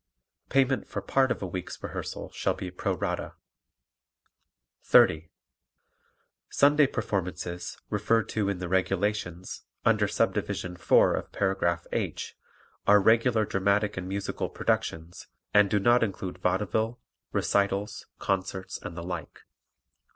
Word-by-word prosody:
Payment 135 0 +2
for - - -4
part 135 -1 +2
of - - -2
a - - -1
week's 90 0 -5
rehearsal - - -5
shall - - -1
be 95 -1 -6
pro 90 - -2
rata. - - -3 1.5
30. 80 +1 +4 1.2
Sunday 145 0 +5
performances, 90 - -3
referred 110 +2 +2
to 105 -3 0
in 100 - -1
the 90 0 -4
"Regulations," 95 -1 -1 0.2
under - - +4
Subdivision 90 -1 -1
4 85 - +4
of - - -4
paragraph 90 -3 0
"H" - - -3 0.5
are 105 0 +7
regular 110 +2 +4
dramatic 100 +2 +1
and 95 0 -5
musical 100 +1 -3
productions 80 +2 -2 0.3
and 105 -1 +6
do 105 - +2
not 120 +4 +4
include 95 -4 -3
vaudeville, 105 +5 0 0.3
recitals, 100 +1 0
concerts 95 -1 -2
and 85 - -7
the 85 - -5
like. 90 -1 -6
100 Hz, 120 wpm, -28 LUFS, 90-105 Hz, 1.5 s, are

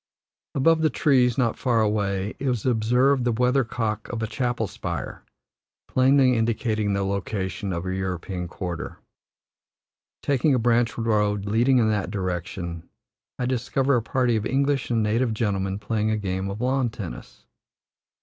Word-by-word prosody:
Above 160 +4 +3
the 155 - +3
trees, 130 -4 +3
not 120 -4 +1
far 120 -3 +2
away, 105 -2 0
is 125 -5 -1
observed 125 +3 +3
the 120 - +1
weathercock 115 -3 0
of 115 -2 -3
a - - +1
chapel 120 0 -1
spire, - - -5 0.6
plainly 130 0 +4
indicating 110 -2 0
the 100 0 0
location 95 -1 -3
of 85 -1 -3
the 95 0 -3
European 95 -1 -3
quarter. 85 -2 -5 1.3
Taking 140 0 +2
a - - +3
branch 120 0 +2
road 105 -3 +1
leading 120 +6 +3
in 110 -3 +3
that 105 -4 -1
direction, 90 -3 -4 0.5
I 125 - -1
discover 130 +2 +1
a 120 - +2
party 125 +1 +1
of 110 +1 -1
English 140 0 0
and 115 -2 +1
native 110 +2 +1
gentlemen 100 -3 -1
playing 105 +1 -1
a 110 - +1
game 95 -1 -2
of 100 +3 -5
lawn 130 0 +1
tennis. 105 -6 -9
110 Hz, 150 wpm, -24 LUFS, 100-125 Hz, 1.3 s, plainly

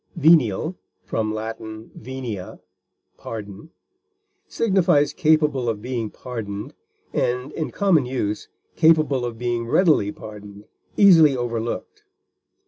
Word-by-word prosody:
Venial 155 - +3 0.3
(L. 110 0 -2 0.4
venia, 120 -6 -7 0.6
pardon) 105 +4 -8 0.8
signifies 185 -9 +2
capable 150 -6 +2
of 110 -2 -2
being 120 -1 -3
pardoned, 105 -5 -7 0.4
and, 125 +3 -1
in 155 - -3
common 175 -10 +2
use, 105 -5 -3 0.3
capable 155 -5 +3
of 120 -2 -4
being 120 -1 -2
readily 150 - +3
pardoned, 105 -1 -11 0.3
easily 165 -9 +7
overlooked. 120 -1 -4
125 Hz, 95 wpm, -22 LUFS, 110-155 Hz, 0.8 s, easily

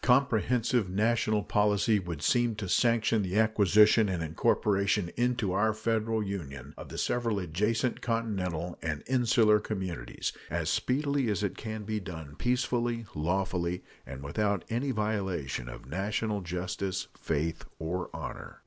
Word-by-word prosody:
Comprehensive 125 -3 +3
national 110 +1 +2
policy 105 +2 +3
would 85 -5 -5
seem 120 +2 +3
to 105 -2 -4
sanction 115 +1 +3
the 95 +1 -1
acquisition 105 0 +5
and 90 -3 -1
incorporation 100 +3 +1
into 120 -4 +1
our 110 +3 +2
Federal 110 0 0
Union 75 -9 -6
of - - -9
the - - -7
several 115 -3 0
adjacent 105 +7 0
continental 95 -8 -2
and 80 -2 -3
insular 115 -4 +4
communities 95 - -4 0.2
as 85 0 -1
speedily 140 +1 +1
as 105 0 0
it 100 - -1
can 110 -1 -5
be 110 +1 -2
done 80 -6 -8
peacefully, 120 -2 0
lawfully, 90 +2 -1 0.2
and 70 0 -8
without 100 +8 0
any 125 +5 0
violation 95 - -2
of - - -9
national 100 - -1
justice, 90 +1 -3
faith, 80 +1 -2
or 90 +3 -3
honor. - - -7
105 Hz, 135 wpm, -30 LUFS, 90-115 Hz, 0.2 s, acquisition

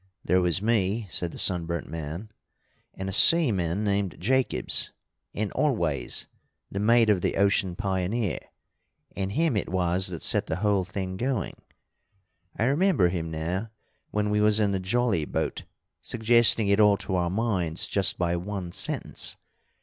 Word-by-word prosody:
"There 90 +1 +3
was 90 +2 0
me," 110 -1 +1
said 85 0 -2
the - - -10
sunburnt 85 -2 0
man, 80 +6 -6 0.6
"and 95 - -5
a - - -3
seaman 100 - +4
named 100 -3 -1
Jacobs, 130 +7 0 0.4
and 105 0 -3
Always, 85 - 0 0.5
the 100 - -3
mate 115 +1 +4
of 95 -4 +1
the - - -1
Ocean 100 -2 +1
Pioneer. 95 +1 -2 0.8
And 100 0 -3
him 160 -1 +1
it 105 - -2
was 90 +1 +1
that 85 -3 -5
set - - 0
the - - -2
whole 100 -1 +1
thing 95 0 -5
going. 125 -4 -2 1.0
I - - 0
remember 140 - +3
him 85 -2 -3
now, 85 +7 -3 0.4
when 105 0 -1
we 105 0 +2
was 105 0 +4
in 105 -2 +2
the 95 - -1
jolly 100 -2 0
boat, - - -3 0.4
suggesting 115 -1 +3
it 100 +1 +3
all 105 -1 +5
to 95 - -4
our 90 -2 +1
minds 95 -3 -1
just 100 -2 +1
by 85 -1 0
one 90 0 -5
sentence. - - -4
100 Hz, 155 wpm, -26 LUFS, 90-110 Hz, 1.0 s, all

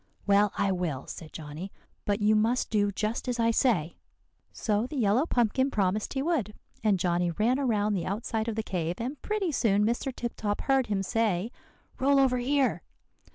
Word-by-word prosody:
"'Well, 200 0 +4
I 200 - +2
will,' 170 -8 -2
said 160 -2 -9
Johnny; 160 +5 -7 0.3
'but 205 +1 0
you 215 +1 +4
must 225 +4 +1
do 205 -2 +2
just 215 +6 -2
as 245 -1 -2
I 230 0 +3
say.' 190 - +1 0.5
So 215 +2 -1
the 300 - -8
yellow 240 +6 +2
pumpkin 250 +2 +2
promised 205 -3 0
he 270 - 0
would; 280 - -1 0.3
and 210 -3 +3
Johnny 175 -1 +1
ran 225 +9 +1
around 215 -6 +1
the 185 -4 -2
outside 220 +2 -2
of 225 - -2
the 220 - -2
cave, 175 -4 -2
and 260 +5 -5
pretty 420 -5 -1
soon 210 -6 +2
Mr. 240 +4 -1
Tip 240 -1 -5
Top 205 -1 -2
heard 270 -2 +2
him 200 -2 -1
say 215 -1 0 0.5
'Roll 275 +1 +4
over 255 -2 +3
here. 270 +2 +1
215 Hz, 185 wpm, -28 LUFS, 200-250 Hz, 0.5 s, Well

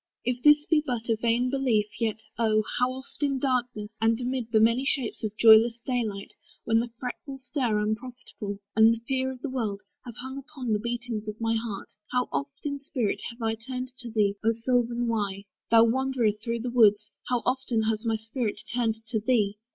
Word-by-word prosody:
If 245 0 -1
this 295 +1 +6
Be 315 -2 +3
but 240 -5 -3
a 225 - +4
vain 235 +3 +1
belief, 255 -6 +2
yet, 220 -2 -1 0.2
oh! 215 -2 +3 0.2
how 250 0 +3
oft, 265 +3 -10
In 280 -2 +1
darkness, 250 -5 -1
and 225 +1 +3
amid 250 -2 -2
the 220 - +5
many 230 +4 +4
shapes 265 -5 -1
Of 215 0 -3
joyless 225 +1 +7
day 250 -2 +1
light; 200 -2 -6 0.3
when 225 0 +3
the 240 +1 -2
fretful 270 +2 -6
stir 250 -4 -1
Unprofitable, 215 -1 -4 0.2
and 220 +1 +6
the - - -8
fever 260 -1 0
of 260 -1 -8
the 295 - -2
world, 215 -6 -2 0.2
Have 240 -2 -8
hung 260 +2 -6
upon 265 -5 -4
the 210 - +1
beatings 235 -1 -4
of 210 0 -5
my 225 0 +1
heart, 225 -3 -4 0.2
How 250 0 +1
oft, 280 +1 -4
in 285 -1 -2
spirit, 250 -6 -2
have 235 0 -9
I 225 0 +1
turned 255 +3 -5
to 240 - -5
thee 210 -3 +2
O 225 +1 +3
sylvan 240 +1 0
Wye! 200 -3 -2 0.2
Thou 230 0 +7
wanderer 250 -1 +2
through 230 +2 -4
the 245 +1 -3
woods, 210 -3 +5 0.2
How 245 -2 0
often 250 -3 0
has 220 0 0
my 225 -1 +1
spirit 220 -1 -3
turned 225 -2 -1
to 220 -2 0
thee! 210 -3 +1
235 Hz, 200 wpm, -27 LUFS, 220-255 Hz, 0.3 s, joyless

